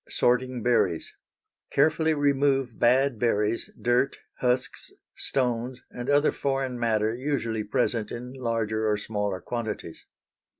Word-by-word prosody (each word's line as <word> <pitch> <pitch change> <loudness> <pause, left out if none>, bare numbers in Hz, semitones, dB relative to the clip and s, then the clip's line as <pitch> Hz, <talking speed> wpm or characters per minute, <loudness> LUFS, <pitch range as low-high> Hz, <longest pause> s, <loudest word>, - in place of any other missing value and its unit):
Sorting 125 -1 +1
Berries. 95 -9 +1 0.6
Carefully 160 +2 +3
remove 140 -4 +1
bad 125 0 +3
berries, 110 -1 +1
dirt, 125 +3 +2 0.2
husks, 125 0 -1 0.2
stones, 125 -1 -1
and 125 +2 -5
other 145 +1 +4
foreign 135 -2 -2
matter 110 -2 +1
usually 120 -4 -2
present 110 +1 0
in 125 +2 -6
larger 115 -4 -1
or 105 - +2
smaller 105 -2 -2
quantities. 110 -9 -5
120 Hz, 115 wpm, -27 LUFS, 110-135 Hz, 0.6 s, other